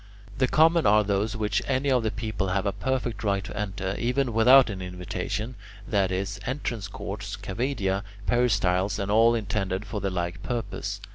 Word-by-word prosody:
The 130 - +4
common 165 +4 +4
are 105 +1 +5
those 100 +3 0
which 105 -3 0
any 135 +1 +1
of 125 -2 +3
the 110 - 0
people 105 -2 -3
have 95 +2 0
a 100 - +1
perfect 120 0 -2
right 100 -2 +1
to 105 - -8
enter, 95 -2 -3
even 125 +1 0
without 125 +2 +6
an 95 -2 -6
invitation: 90 +5 -4 0.3
that 100 -3 +1
is, 95 +1 -2
entrance 125 -6 -3
courts, 100 +1 -6
cavaedia, 100 -1 -1 0.2
peristyles, 100 -6 +2
and 100 -1 -2
all 115 +2 +5
intended 100 -2 -2
for 105 -1 -4
the 100 - 0
like 85 -1 -3
purpose. 115 -4 -4
105 Hz, 170 wpm, -26 LUFS, 95-120 Hz, 0.3 s, without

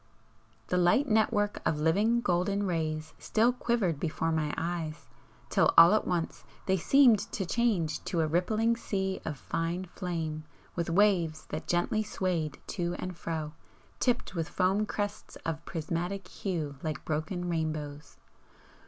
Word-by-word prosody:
The 180 - +2
light 180 +11 +4
network 215 -2 +2
of 150 - 0
living 205 +10 +3
golden 195 +1 +1
rays 155 -3 -2
still 230 +3 +2
quivered 235 - 0
before 165 +1 -1
my 155 -2 0
eyes, 165 -2 -3 0.5
till - - +4
all 170 +5 +10
at 215 - +1
once 175 -2 -2 0.2
they 190 - +3
seemed 240 - +5
to 195 - -2
change 195 -7 0
to 170 - 0
a - - +2
rippling 215 +8 +2
sea 190 -4 -2
of 150 -3 -3
fine 170 +5 -2
flame 165 -4 -4 0.3
with 170 -1 -1
waves 170 -4 +2
that 155 - -5
gently 195 +6 +1
swayed 180 -7 -2
to 175 -3 -2
and 185 -1 -5
fro, 160 -2 -4 0.5
tipped 245 -1 0
with 165 -4 -2
foam 195 +5 +1
crests 205 0 -4
of 165 0 -3
prismatic 175 +3 -3
hue 160 -9 -4
like 155 -3 -4
broken 160 +4 -2
rainbows. 155 -3 -3
175 Hz, 145 wpm, -30 LUFS, 160-205 Hz, 0.5 s, all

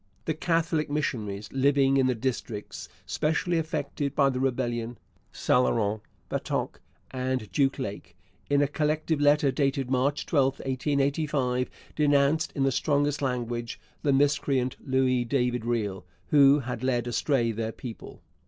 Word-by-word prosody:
The 160 - 0
Catholic 160 -1 0
missionaries 110 -9 -2
living 135 0 +3
in 130 -1 +3
the 125 - +1
districts 115 -3 -4 0.2
specially 165 +2 0
affected 150 -3 -3
by 140 -2 +4
the 130 - -3
rebellion 120 -3 -1 0.3
St 125 - +2
Laurent, 110 -3 0 0.3
Batoche, - - -2 0.3
and 130 -5 -2
Duck 135 +5 +2
Lake 100 -8 -6 0.3
in 145 0 +4
a - - +2
collective 155 +1 0
letter 145 -1 +4
dated 135 -2 0
March 135 +3 +1
12, 135 -4 +2
1885, 135 -1 0 0.3
denounced 145 +1 +2
in 135 - +1
the 135 - +3
strongest 145 +2 +1
language 120 -3 -3 0.2
'the 140 - +2
miscreant 135 -2 +1
Louis 130 -2 +2
David 125 -2 0
Riel' 105 -5 -1 0.3
who 140 0 +6
had 120 -2 -5
led 120 -2 +1
astray 120 0 +1
their 110 0 -3
people. 115 0 -10
135 Hz, 135 wpm, -27 LUFS, 120-145 Hz, 0.3 s, who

